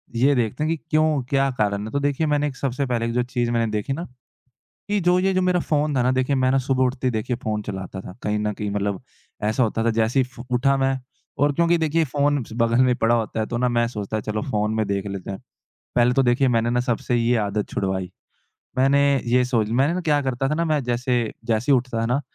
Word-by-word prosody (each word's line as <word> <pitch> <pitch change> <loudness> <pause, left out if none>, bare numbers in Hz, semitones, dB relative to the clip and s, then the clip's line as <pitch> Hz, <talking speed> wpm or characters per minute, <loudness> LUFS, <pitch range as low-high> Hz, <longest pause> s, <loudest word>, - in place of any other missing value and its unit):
ये 135 +4 +3
देखते 120 +3 -1
हैं 155 - 0
कि 165 - 0
क्यों, 155 -2 +2
क्या 135 0 +2
कारण 100 -1 0
है? 110 - -7
तो 140 - 0
देखिए 145 +2 0
मैंने 150 0 +1
एक 135 - -6
सबसे 135 +1 -2
पहले 120 -3 -1
एक 115 - -2
जो 125 +1 +1
चीज़ 120 -1 -2
मैंने 115 -2 0
देखी 105 +5 -2
ना, 165 +5 -4 0.9
कि 205 0 +1
जो 180 0 +3
ये 190 +1 +2
जो 185 - +2
मेरा 180 -1 +2
फ़ोन 150 -2 0
था 125 - +3
ना 125 - +2
देखिए 130 +2 +1
मैं 130 0 +2
ना 135 - +3
सुबह 130 0 +1
उठते 130 0 0
देखिए 115 +1 -2
फ़ोन 105 -2 -2
चलाता 95 -2 -6
था 95 0 -10
कहीं 105 0 0
न 105 0 -1
कहीं 105 0 -4
मतलब, 100 -1 -2 0.4
ऐसा 110 +5 +1
होता 115 0 0
था 115 - +3
जैसे 115 +4 +2
ही 130 - +2
फ़ 125 -1 -14
उठा 135 +3 +3
मैं। 135 0 +1 0.4
और 145 +1 +3
क्योंकि 170 +2 +2
देखिए 160 0 +1
ये - - +3
फ़ोन 145 -1 +1
बगल 115 +1 +3
में 125 - +3
पड़ा 115 +1 +2
होता 110 -1 -1
है 110 - -1
तो 120 - -4
ना 125 0 +2
मैं 120 -1 +1
सोचता 105 -2 -4
है 110 - -3
चलो 105 0 -3
फ़ोन 105 0 0
में 110 -2 0
देख 100 0 -2
लेते 100 -1 -5
हैं, 95 - -5 0.6
पहले 120 0 +4
तो 135 - +3
देखिए 125 +2 +3
मैंने 115 -1 +2
ना 120 +1 +1
सबसे 120 0 -1
ये 120 +1 +2
आदत 105 0 -2
छुड़वाई। 95 -1 -2 0.7
मैंने 135 +2 +4 0.3
ये 125 +1 +3
सोच 115 -4 0
मैंने 160 +7 +2
क्या 150 -2 +2
करता 130 0 -1
था 150 - 0
ना 170 +2 0
मैं 155 -3 +1
जैसे 125 +1 0 0.3
जैसे 115 +3 0
ही - - +6
उठता 125 -2 -2
था - - 0
ना, 125 +4 +1
125 Hz, 250 wpm, -23 LUFS, 110-140 Hz, 0.9 s, ही